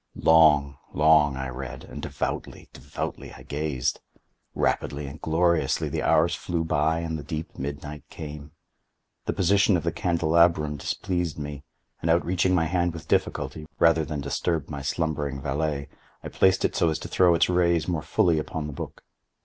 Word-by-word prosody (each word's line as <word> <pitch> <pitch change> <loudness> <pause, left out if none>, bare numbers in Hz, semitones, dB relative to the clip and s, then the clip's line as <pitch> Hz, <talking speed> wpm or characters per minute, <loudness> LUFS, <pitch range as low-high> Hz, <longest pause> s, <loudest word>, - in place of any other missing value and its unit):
Long, 75 -4 +5 0.2
long 75 -2 +5
I 65 0 -3
read—and 65 0 -7
devoutly, - - -4
devotedly - - -6
I - - -12
gazed. 70 -4 -2 0.6
Rapidly 70 +1 -1
and 70 +3 -9
gloriously 85 +1 +1
the - - -2
hours 85 +2 +3
flew 85 -1 -2
by 80 +1 +1
and 80 -1 -3
the - - -7
deep 80 +3 -5
midnight 70 +1 -6
came. 75 -2 -8 0.7
The - - -1
position 100 +1 +3
of - - -4
the 85 - 0
candelabrum 85 -2 +2
displeased 85 +2 -2
me, 75 -1 -6 0.4
and 85 - -1
outreaching 90 +2 +2
my 80 -2 +2
hand 85 +1 0
with 85 - -9
difficulty, 75 -1 -1
rather 80 -1 +4
than 75 -2 -4
disturb 75 +2 -2
my 70 -1 -5
slumbering 70 -1 -2
valet, 70 +1 -2 0.4
I - - -5
placed 95 0 +3
it - - -1
so 85 - +3
as 80 - -1
to - - -7
throw 90 -2 +4
its - - +3
rays 85 -2 +2
more 85 -4 -1
fully 80 0 +2
upon 75 0 -4
the 75 - -6
book. - - -8
80 Hz, 165 wpm, -26 LUFS, 75-85 Hz, 0.7 s, Long